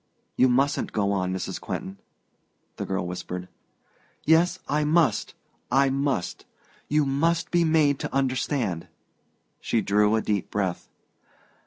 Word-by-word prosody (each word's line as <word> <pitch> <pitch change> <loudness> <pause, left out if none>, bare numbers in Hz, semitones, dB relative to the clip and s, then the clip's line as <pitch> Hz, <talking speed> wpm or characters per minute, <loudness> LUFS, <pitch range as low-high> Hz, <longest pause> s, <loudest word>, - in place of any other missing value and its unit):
"You 130 - +4
mustn't 135 +3 +1
go 100 -2 +1
on, 95 -2 0
Mrs. 95 - -4
Quentin," 95 +1 -5 0.8
the - - -4
girl 95 -2 -1
whispered. 90 0 -5 0.8
"Yes, 170 +3 +4
I 150 +1 +1
must 155 0 +2 0.4
I 135 +1 +4
must! 135 -10 -2 0.4
You 150 0 +2
must 165 +5 0
be 175 -1 +3
made 155 -4 +3
to - - -4
understand." 130 - -1 0.7
She 115 - 0
drew 105 +2 +3
a 110 - +1
deep 100 -3 -1
breath. 95 -4 -2
130 Hz, 130 wpm, -25 LUFS, 100-150 Hz, 0.8 s, You